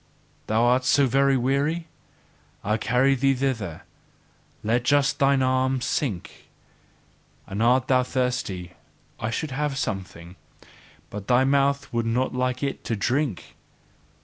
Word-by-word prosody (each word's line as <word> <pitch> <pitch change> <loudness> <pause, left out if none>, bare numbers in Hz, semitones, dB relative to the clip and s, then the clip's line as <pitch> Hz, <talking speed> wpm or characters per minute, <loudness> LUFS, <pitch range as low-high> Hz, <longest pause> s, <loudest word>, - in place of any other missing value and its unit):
Thou 110 +2 +2
art 125 +2 +3
so 135 +2 +4
very 135 +1 +3
weary? 140 +6 0 0.8
I 105 +2 +1
carry 125 +4 +2
thee 135 +1 +2
thither; 115 -11 -3 0.8
let 115 +3 +1
just 145 +2 +2
thine 135 -1 +3
arm 130 0 +1
sink! 120 - -3 1.0
And 100 +3 -4
art 125 +2 +3
thou 130 -1 +4
thirsty 125 -8 -2 0.5
I 110 - -2
should 145 +6 -3
have 145 0 -2
something; 95 -5 -5 0.7
but 100 -1 -7
thy 125 +1 +4
mouth 140 0 +1
would 115 -1 0
not 125 +3 0
like 125 +1 -1
it 140 - -3
to 115 - -1
drink! 125 - -2
130 Hz, 130 wpm, -24 LUFS, 115-135 Hz, 1.0 s, so